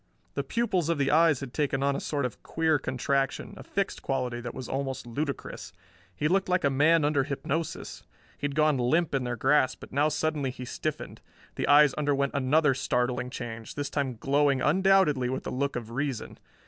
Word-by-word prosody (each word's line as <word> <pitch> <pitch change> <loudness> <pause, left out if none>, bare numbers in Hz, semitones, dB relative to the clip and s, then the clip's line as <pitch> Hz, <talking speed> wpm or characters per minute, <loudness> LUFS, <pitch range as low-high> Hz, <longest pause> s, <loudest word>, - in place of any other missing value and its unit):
The - - -2
pupils 195 -9 0
of 170 - +1
the 140 -1 +1
eyes 160 -3 +4
had 130 -3 -7
taken 140 -3 0
on 140 0 +2
a - - -2
sort 145 -3 -2
of 125 - -6
queer 160 -2 +1
contraction, 135 - -1
a - - -10
fixed 200 -1 -3
quality 125 -3 -2
that 120 -1 -6
was 125 - -6
almost 135 -2 -3
ludicrous. 140 +4 -5 0.4
He 150 - 0
looked 190 +3 +1
like 180 0 +2
a 140 - +3
man 150 +3 +4
under 145 -2 +2
hypnosis. 150 +3 -4 0.3
He - - -5
had 140 -1 -2
gone 155 -3 +3
limp 150 +7 +1
in 135 -2 0
their 120 0 -2
grasp, 135 +3 +2
but - - -12
now 145 +3 +3
suddenly 155 -2 -1
he 125 0 -7
stiffened. - - -5 0.3
The - - -2
eyes 145 -1 +6
underwent 140 -2 0
another 140 +2 +3
startling 125 -1 -1
change, 115 -3 -7
this 145 -1 -3
time 135 -4 -1
glowing 140 0 +2
undoubtedly 190 -7 +3
with 130 - -3
the - - -5
look 140 +2 -1
of 115 -2 -5
reason. 135 -1 -3
140 Hz, 195 wpm, -28 LUFS, 130-155 Hz, 0.4 s, eyes